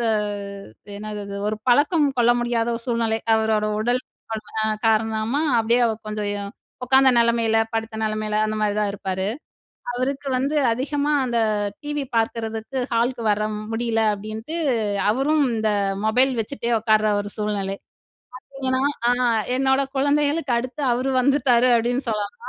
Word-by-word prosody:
த 235 - -1 0.9
என்னது 210 0 -6
அது, 200 0 -6
ஒரு 215 - -2
பழக்கம் 290 +4 +4
கொள்ள 240 0 +5
முடியாத 240 -1 0
ஒரு 230 - -9
சூழ்நிலை. 230 -2 +1 0.2
அவரோட 220 -1 +1
உடல் 245 +3 0 0.3
அல் 215 -1 -6 0.2
அ - - +1 0.2
காரணமா 220 +5 +1 0.2
அப்பிடியே 230 +2 +2 0.3
கொஞ்சம் 210 -1 -3
எ - - -4 0.5
உக்காந்த 265 +1 +5
நிலைமையில, 230 -1 +3
படுத்த 225 0 -3
நிலமையில, 215 -1 -1
அந்தமாரிதான் 210 -1 0
இருப்பாரு. 190 -1 -3 0.7
அவருக்கு 275 +3 -2
வந்து 275 +4 0
அதிகமா 285 +5 -1
அந்த 240 -2 0 0.4
டிவி 295 -1 -3
பார்க்கிறதுக்கு 225 +2 -2
ஹாலுக்கு 235 +1 0
வர 210 0 +2 0.3
முடியல 225 0 0
அப்பிடின்ட்டு, 215 +9 -6 0.5
அவரும் 285 +5 +2
இந்த 220 -1 0 0.3
மொபைல் 255 +5 +3
வச்சுட்டே 235 +1 -4
உக்கார்ற 215 -1 +2
ஒரு 205 0 -6
சூழ்நிலை. 200 -2 -2 0.8
பாத்தீங்கன்னா, 260 -1 -1 0.3
ஆ, - - +4 0.5
என்னோட 265 +1 +2
குழந்தைகளுக்கு 285 0 +1
அடுத்து 255 +4 -5
அவரு 255 +3 0
வந்துட்டாரு 255 -2 +3
அப்படின்னு 245 +3 0
சொல்லலாம். 210 -2 -2
230 Hz, 130 wpm, -22 LUFS, 215-265 Hz, 0.9 s, கொள்ள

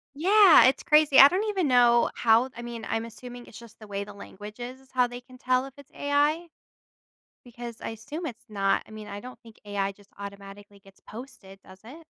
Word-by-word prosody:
Yeah, 385 +4 +6
it's 260 - +2
crazy. 300 -2 +4
I 275 - +11
don't 370 +7 -1
even 390 -6 -1
know 240 -2 +4
how 230 +2 +3
I 240 - -8
mean, 235 -1 -7
I'm 225 0 -2
assuming 245 +1 -11
it's - - -13
just 230 -1 -16
the 215 - -13
way 200 0 -4
the 205 0 -11
language 205 +2 -11
is, 250 +2 -8
is 265 - -25
how 250 -1 +2
they 245 0 -9
can 255 0 -17
tell 255 +1 0
if 270 - -12
it's 285 -2 -16
AI 295 +4 0 1.0
because 240 -1 -9
I - - -5
assume 285 +10 -7
it's 240 -5 -8
not 195 -2 0
I - - -16
mean, 215 -1 -10
I 205 0 -7
don't 250 +3 -12
think 225 -1 -17
AI 200 -1 -2
just 200 0 -22
automatically 200 0 -11
gets 195 -1 -21
posted, 215 -5 -12
does 190 0 -16
it? 310 +8 -13
240 Hz, 215 wpm, -26 LUFS, 205-265 Hz, 1.0 s, I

